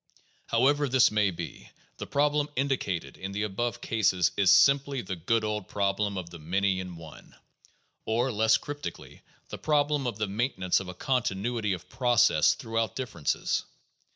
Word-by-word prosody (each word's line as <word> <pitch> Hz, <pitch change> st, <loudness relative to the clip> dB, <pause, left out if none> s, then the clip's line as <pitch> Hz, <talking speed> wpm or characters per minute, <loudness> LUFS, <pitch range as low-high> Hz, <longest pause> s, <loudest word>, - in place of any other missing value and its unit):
However 140 Hz, +4 st, +2 dB
this 130 Hz, -3 st, +5 dB
may 105 Hz, -2 st, +2 dB
be, 85 Hz, -2 st, -8 dB, 0.3 s
the -, -, -5 dB
problem 145 Hz, +1 st, +1 dB
indicated 100 Hz, -, -2 dB
in 95 Hz, +1 st, -6 dB
the 105 Hz, +1 st, -2 dB
above 110 Hz, +4 st, -3 dB
cases 95 Hz, -6 st, +1 dB
is 100 Hz, -2 st, +3 dB
simply 140 Hz, -1 st, +4 dB
the 95 Hz, -1 st, -4 dB
good 110 Hz, +7 st, 0 dB
old 105 Hz, -2 st, -3 dB
problem 100 Hz, 0 st, -1 dB
of 85 Hz, -2 st, -6 dB
the 85 Hz, -, -10 dB
many 95 Hz, +4 st, 0 dB
in 90 Hz, -1 st, -6 dB
one, 80 Hz, -1 st, -13 dB, 0.7 s
or, 120 Hz, +4 st, 0 dB
less 110 Hz, 0 st, +3 dB
cryp 145 Hz, 0 st, -7 dB
tically, -, -, -8 dB, 0.3 s
the -, -, -7 dB
problem 145 Hz, -2 st, +1 dB
of 115 Hz, -4 st, -3 dB
the 105 Hz, -, 0 dB
maintenance 100 Hz, -3 st, 0 dB
of 95 Hz, -, -7 dB
a 90 Hz, -, -7 dB
continuity 115 Hz, -2 st, -1 dB
of 90 Hz, 0 st, -7 dB
process 120 Hz, +3 st, +3 dB
throughout 115 Hz, -2 st, -2 dB
differences. 100 Hz, -, -2 dB
105 Hz, 160 wpm, -28 LUFS, 95-130 Hz, 0.7 s, this